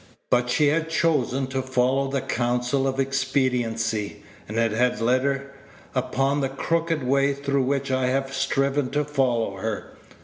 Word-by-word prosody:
But 125 0 +3
she 145 +4 +3
had 160 +2 0
chosen 140 -5 +1
to 135 0 -1
follow 130 +1 +1
the 135 -1 -1
counsel 125 +1 0
of 135 0 -2
expediency, 125 -5 -1 0.2
and 110 - -5
it 115 -1 +2
had 120 +1 +1
led 125 +3 +2
her 140 0 -2 0.4
upon 135 +2 0
the 135 - 0
crooked 165 +2 -1
way 140 +2 +2
through 140 -1 0
which 140 0 -1
I 130 -1 +1
have 135 +1 -1
striven 135 0 0
to 150 0 +1
follow 125 -8 0
her. 110 +2 -4
135 Hz, 160 wpm, -24 LUFS, 125-140 Hz, 0.4 s, But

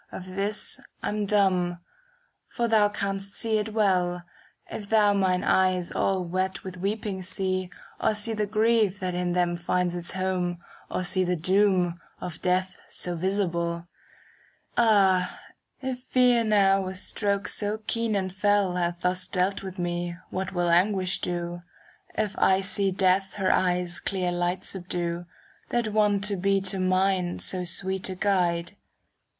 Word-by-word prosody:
Of 185 0 -8
this 200 +1 -3 0.2
I'm 210 -1 -1
dumb; 185 -4 +2 0.7
for 235 -1 -1
thou 215 -2 +4
canst 195 -1 -3
see 220 -1 +1
it 215 +1 -3
well, 180 -5 +1 0.4
If 205 -2 -7
thou 210 -2 +5
mine 185 -2 +1
eyes 185 -2 +2
all 190 -1 +1
wet 185 +2 -2
with 185 -1 -7
weeping 200 0 -2
see. 185 0 -2 0.3
Or 215 - +2
see 210 +2 -2
the 210 -1 -1
grief 215 -2 +2
that 185 -1 -2
in 180 0 -1
them 175 -1 +1
finds 175 +1 0
its 175 -1 -5
home, 185 -2 -1
^ - - -18 0.3
Or 185 - -2
see 185 +1 +2
the 180 0 0
doom, 180 0 +2 0.2
of 175 -2 -6
death 185 +1 0
so 175 -1 -4
visible. 170 -2 -1 0.9
Ah, 195 -5 +3 0.4
if 260 -2 -3
fear 250 -2 +3
now 195 -3 +4
with 185 0 -5
strokes 200 +1 -1
so 210 +1 0
keen 230 -1 0
and 190 -2 -1
fell 195 -1 +2
Hath 175 0 -1
thus 180 0 0
dealt 190 +1 0
with 190 -1 -7
me, 175 -1 -2 0.2
what 190 0 -3
will 175 -2 +1
anguish 185 +1 +2
do. 175 0 -3 0.6
If 215 -2 -1
I 190 0 +4
see 195 0 +2
Death 190 0 +2
her 190 -2 +1
eyes' 180 -1 +1
clear 185 -2 -1
light 175 +1 -1
subdue, 175 -2 -3 0.4
That 235 -3 0
wont 205 -2 +3
to 205 -1 0
be 195 +2 +2
to 190 0 -3
mine 185 -1 +1
so 185 -1 0
sweet 190 +2 -1
a 185 - -4
guide! 180 -2 0
190 Hz, 155 wpm, -26 LUFS, 180-205 Hz, 0.9 s, thou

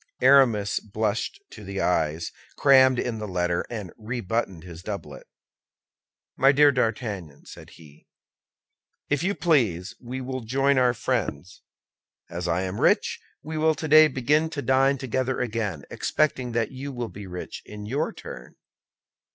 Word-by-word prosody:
Aramis 115 -7 +4
blushed 110 - -2
to - - -11
the 100 0 -5
eyes, 80 -2 0 0.3
crammed 130 -2 +6
in 120 -2 -2
the 105 - -5
letter, 90 -2 -1
and 105 -6 -6
re 120 +3 -4
buttoned 95 -5 -2
his 85 -2 -10
doublet. 100 +1 -7 1.1
"My 135 +1 +5
dear 145 +1 +6
D'Artagnan," 110 - -3
said - - -12
he, 75 -2 -18 1.0
"if 145 - +2
you 195 +4 0
please, 110 - +1
we 125 +2 -6
will 130 0 -4
join 135 +4 +2
our 125 -1 +3
friends; 100 - -3 0.7
as 85 +1 -4
I 85 +2 0
am 95 +2 -4
rich, - - +2 0.2
we 155 0 -4
will 160 0 +3
today 155 0 +6
begin 150 +4 +1
to 145 -3 -5
dine 135 +2 +3
together 130 0 -2
again, 110 - -2
expecting 130 -5 0
that 115 -2 0
you 135 +2 -6
will 120 -3 -4
be 100 -1 -9
rich 90 0 -7
in 105 -1 -9
your 135 +8 -1
turn." - - -10
115 Hz, 150 wpm, -25 LUFS, 95-135 Hz, 1.1 s, crammed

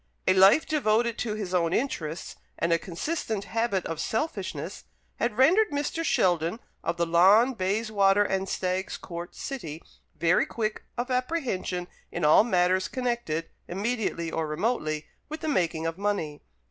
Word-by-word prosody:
A - - +6
life 195 +10 +6
devoted 235 -6 +1
to 215 -3 -2
his 200 -4 -4
own 170 -1 +2
interests, 170 - -2 0.2
and 170 0 +1
a 165 - +3
consistent 215 - -3
habit 225 -5 -1
of 165 -1 -4
selfishness, 220 - -3 0.3
had 235 -2 -1
rendered 365 +12 +5
Mr. 290 +3 -2
Sheldon, 175 - +1 0.2
of 170 - -1
the 170 - +2
Lawn, 195 +10 +5
Bayswater, 205 -1 +2
and 190 -1 -1
Stags 185 +1 -2
Court, 170 0 -8
City, 165 - -5 0.4
very 170 +2 +3
quick 215 -2 -3
of 245 +2 -2
apprehension 250 - -1 0.2
in - - -1
all 150 +7 +7
matters 185 -3 +2
connected, 235 - -2 0.2
immediately 195 -4 -2
or 160 -1 -1
remotely, 155 -3 -1 0.2
with 310 +1 -6
the - - -3
making 170 - 0
of 165 +2 -3
money. 200 -8 -2
195 Hz, 145 wpm, -27 LUFS, 170-235 Hz, 0.4 s, all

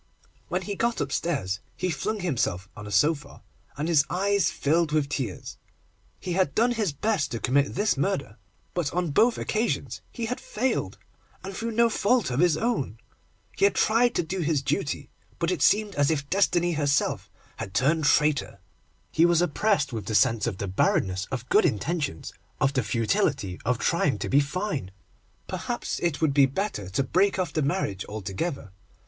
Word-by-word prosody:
When - - -2
he 205 - -4
got 235 +4 0
upstairs, 135 - -1 0.2
he 185 -1 -1
flung 210 +8 -2
himself 115 - -1
on 105 -1 -8
a - - -7
sofa, 145 +9 +1 0.3
and 150 +3 -2
his 160 -4 +4
eyes 195 -2 +2
filled 160 +2 +1
with 150 -2 +1
tears. 125 -9 -4 0.6
He 180 - -4
had 180 -5 +1
done 235 +3 +3
his 215 -7 0
best 155 -1 0
to 115 - -4
commit 140 +4 +1
this 205 -4 +1
murder, 140 - -1 0.4
but 170 -5 -1
on 175 -3 0
both 230 +11 +3
occasions 225 +2 -2
he 235 - -4
had 245 +3 -3
failed, 255 +5 -2 0.5
and 190 0 -6
through 230 +2 -3
no 235 +1 +4
fault 225 - +1
of 125 - -1
his 170 -2 +4
own. 220 - -1 0.6
He - - +3
had 200 - +3
tried 235 +2 +3
to - - +1
do 185 +4 -4
his 155 -4 0
duty, 145 +1 -2 0.3
but 170 +1 0
it 175 -7 -2
seemed 210 +3 +3
as 145 -1 +2
if 140 -3 -1
Destiny 175 -2 +2
herself 145 -2 0 0.3
had 95 -1 -7
turned 155 +4 +2
traitor. 140 -10 +2 0.5
He 165 +2 +4
was 170 -1 +3
oppressed 175 - +1
with 110 -2 -5
the 110 - -1
sense 115 -2 +3
of 105 -5 -3
the 100 - -3
barrenness 95 +1 +1
of 125 -1 -5
good - - +4
intentions, 140 - -2 0.3
of 135 +1 +2
the 130 - +2
futility 105 -4 0
of 125 +2 +1
trying 145 +2 +1
to - - -4
be 140 - +5
fine. 150 - -2 0.6
Perhaps, - - -3
it 170 -4 -1
would 155 -3 +2
be 140 -1 +5
better 135 - -3
to 95 +9 0
break 190 +9 +2
off 185 -1 -2
the 155 - 0
marriage 140 - -1
altogether. 105 - -4
150 Hz, 180 wpm, -26 LUFS, 130-190 Hz, 0.6 s, be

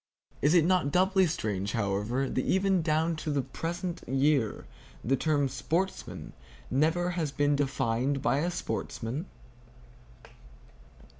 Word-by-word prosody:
Is 150 +5 +4
it 165 -3 +5
not 180 -5 +2
doubly 190 +2 +4
strange, 100 - -2
however, 110 +5 0
that 130 - -1
even 190 -1 +2
down 160 +1 +1
to 155 - -4
the 145 -2 0
present 170 +5 -4
year 135 -4 +1 0.4
the 135 +4 +2
term 145 0 +1
"sportsmen" 165 +8 -3 0.4
never 165 +5 +2
has 165 -5 -2
been 145 +1 +2
defined 135 -1 0
by 135 0 +1
a 170 +4 0
sportsman! 150 -3 -4
145 Hz, 125 wpm, -29 LUFS, 130-175 Hz, 0.4 s, it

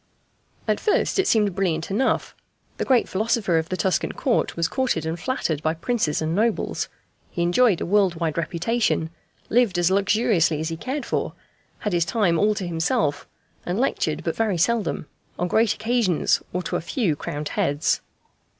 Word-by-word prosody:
At - - +1
first 420 -2 +1
it 385 - +2
seemed 210 -4 +3
brilliant 175 -3 -1
enough. 255 +7 0 0.4
The - - -2
great 255 -3 +3
philosopher 205 -4 +1
of 160 - -5
the 185 - -2
Tuscan 190 -1 0
Court 250 -4 0
was 170 -1 +2
courted 240 - -1
and 165 +2 -3
flattered 165 - -1
by 155 +1 0
princes 165 -4 0
and 160 +1 -1
nobles, 220 +4 0 0.4
he 170 - -2
enjoyed 180 +3 +3
a - - -1
world 195 -1 +3
wide 165 -2 -2
reputation, 170 0 0 0.4
lived 230 -6 +3
as 175 +1 +2
luxuriously 195 -5 +2
as 160 +1 -2
he 165 - -3
cared 260 - -4
for, - - -2 0.5
had 210 - -2
his 170 -1 +3
time 170 -3 +1
all 210 +1 +3
to 195 -3 -3
himself, 160 -3 0 0.4
and 180 +4 -2
lectured 165 - 0
but 165 - -2
very 215 -5 0
seldom, 215 -1 0 0.3
on 180 - 0
great 220 +4 +2
occasions 225 -7 +1
or 180 +1 -2
to - - -1
a - - -4
few 170 - 0
crowned 145 +1 -5
heads. 145 +2 0
185 Hz, 175 wpm, -23 LUFS, 165-225 Hz, 0.5 s, seemed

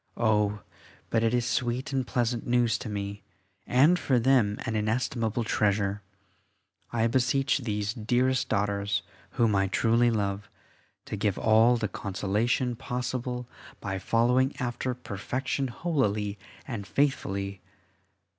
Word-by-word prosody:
Oh! 105 -2 +2 0.5
but 115 - +2
it 115 - +3
is 120 -1 +1
sweet 125 +2 -1
and 130 -2 0
pleasant 120 -1 -1
news 120 -2 +2
to 110 - -6
me, 100 0 -4 0.5
and 150 +8 +5
for 130 - +2
them 120 -4 +3
an 115 -3 -2
inestimable 115 +1 0
treasure. 100 -2 +1 0.9
I 115 -1 +1
beseech 130 +4 +2
these 105 -4 -2
dearest 125 +3 +1
daughters, 100 -3 0 0.3
whom 115 -4 +2
I 95 0 +2
truly 115 +4 +3
love, 100 -2 -2 0.6
to - - -4
give 105 -2 0
all 115 +2 +5
the 110 -2 -1
consolation 105 +6 -1
possible 125 0 -3 0.3
by 95 -2 -3
following 125 +6 +2
after 125 0 -2
perfection 130 +4 -3
holily 110 - -1 0.3
and 110 -7 -5
faithfully. 100 -8 -1
115 Hz, 125 wpm, -28 LUFS, 105-125 Hz, 0.9 s, and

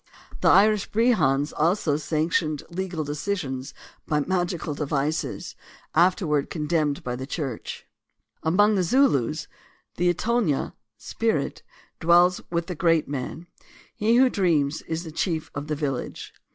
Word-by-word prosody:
The - - +1
Irish 210 0 +5
Brehons 185 - +2
also 160 -1 +2
sanctioned 155 0 0
legal 175 -2 -3
decisions 145 -3 -4 0.3
by 150 -1 +1
magical 175 -1 -1
devices, 145 +2 -2 0.4
afterward 165 -4 +2
con 155 -3 -3
demned 150 -3 0
by 125 0 -3
the 130 +2 -6
Church. 140 -8 -5 0.6
Among 205 +7 +3
the 195 - +2
Zulus 155 - +2 0.2
" - - -38
the 175 +1 +3
Itonyo 215 - 0 0.2
(spirit) 225 - -2 0.4
dwells 175 +2 +4
with 170 -1 -1
the 180 - -4
great 165 -1 +2
man; 140 +4 -5 0.5
he 220 +3 +2
who 260 +2 +6
dreams 155 -6 +1
is 165 +1 -3
the 160 - -8
chief 160 -1 -2
of 145 +1 -5
the 150 - -1
village." 140 -4 -4
160 Hz, 135 wpm, -25 LUFS, 145-185 Hz, 0.6 s, who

